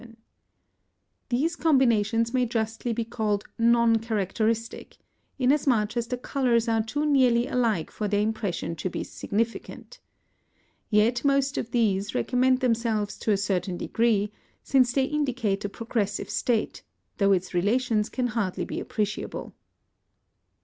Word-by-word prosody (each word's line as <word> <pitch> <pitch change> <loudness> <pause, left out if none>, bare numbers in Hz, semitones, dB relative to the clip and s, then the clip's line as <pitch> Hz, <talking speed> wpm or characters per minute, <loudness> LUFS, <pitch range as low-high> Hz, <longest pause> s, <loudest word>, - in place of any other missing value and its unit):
These 300 +8 0
combinations 230 -7 +2
may 250 -1 +2
justly 225 +1 -2
be 230 0 -2
called 215 -3 -1 0.2
non 235 0 +4
characteristic, 225 +1 -2 0.4
inasmuch 250 -5 +2
as 235 -1 -1
the 250 - -3
colours 245 -2 0
are 225 -1 +2
too 290 +7 -2
nearly 255 -5 +3
alike 230 - 0
for 210 - -3
their 205 0 +1
impression 210 -6 -2
to 185 - -3
be - - -4
significant. 230 - -4 0.9
Yet 225 +3 +2
most 275 0 +2
of 225 - -3
these 210 -4 0
recommend 255 - +2
themselves 230 -4 0
to 220 - 0
a 200 - +3
certain 185 -2 -1
degree, 210 0 +1 0.3
since 255 -3 +3
they 265 +1 +2
indicate 255 -9 -1
a - - -2
progressive 215 -2 -3
state, 235 -3 -1 0.4
though 200 -1 +4
its 185 -1 0
relations 215 +3 +1
can 255 - -2
hardly 225 -6 -2
be - - -4
appreciable. 215 0 -4
230 Hz, 130 wpm, -26 LUFS, 210-250 Hz, 0.9 s, non